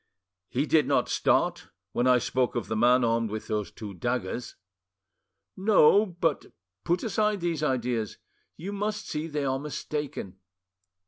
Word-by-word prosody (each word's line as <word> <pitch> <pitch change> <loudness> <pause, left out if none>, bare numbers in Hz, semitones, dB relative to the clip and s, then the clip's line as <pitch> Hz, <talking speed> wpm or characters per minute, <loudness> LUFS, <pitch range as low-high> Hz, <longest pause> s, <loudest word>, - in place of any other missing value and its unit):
"He 135 +4 0
did 155 -1 +3
not - - +2
start - - +1 0.2
when 120 - +1
I 125 -1 +6
spoke 125 +1 0
of 120 - -1
the 110 - -2
man 125 +3 +4
armed 115 -1 +1
with 110 +1 -5
those 105 -2 -2
two 105 -3 -8
daggers?" 120 +4 -3 1.0
"No. 200 +1 +5
But 170 -4 -1 0.4
put 175 +1 0
aside 210 -1 +1
these 170 -3 -1
ideas; 125 -6 -1 0.4
you 190 +6 -5
must 210 +1 -3
see 155 +1 -3
they 150 -3 -2
are 135 0 0
mistaken." 145 -9 -5
135 Hz, 145 wpm, -27 LUFS, 120-170 Hz, 1.0 s, I